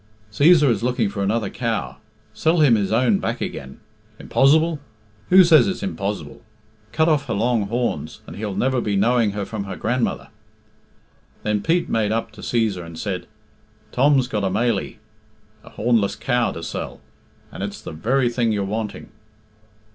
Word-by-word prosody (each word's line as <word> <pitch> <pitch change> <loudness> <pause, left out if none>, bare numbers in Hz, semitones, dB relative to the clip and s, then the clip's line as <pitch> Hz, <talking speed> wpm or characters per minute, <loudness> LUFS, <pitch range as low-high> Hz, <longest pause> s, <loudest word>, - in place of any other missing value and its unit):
"Cæsar 150 - +5
is 110 - -1
looking 120 -3 0
for 100 - -5
another 105 +1 0
cow 115 -3 -3 0.4
sell 160 +2 +1
him 140 -6 +6
his 100 -3 +1
own 115 -3 +3
back - - -3
again. 65 - -6 0.4
Impozz'ble? 155 +3 +3 0.5
Who 185 +1 +8
says 165 -1 +6
it's 190 +1 -3
impozz'ble? 105 - -4 0.5
Cut 160 0 +2
off 150 -3 +1
her 115 - -1
long 110 -1 +1
horns, 105 - -3
and - - -10
he'll 105 -1 -4
never 130 -1 +1
be 105 -3 -1
knowing 115 +1 +2
her 100 -1 -3
from 105 -2 -5
her 95 - -6
grandmother." 125 +2 -2 1.1
Then 105 -1 0
Pete 170 +2 +1
made 110 -2 0
up 115 +1 -2
to - - -13
Cæsar 110 -6 -1
and 85 -1 -10
said, 95 -1 -4 0.6
"Tom's 135 -1 +3
got 105 -4 -2
a 95 - +1
mailie 110 +1 -1 0.6
(hornless) 110 -3 0
cow 120 -2 0
to 85 - -8
sell, - - -5 0.5
and - - -8
it's - - -4
the - - -8
very 120 +11 +1
thing 120 -1 0
you're 105 -2 0
wanting." 105 +2 -4
115 Hz, 160 wpm, -22 LUFS, 100-130 Hz, 1.1 s, Who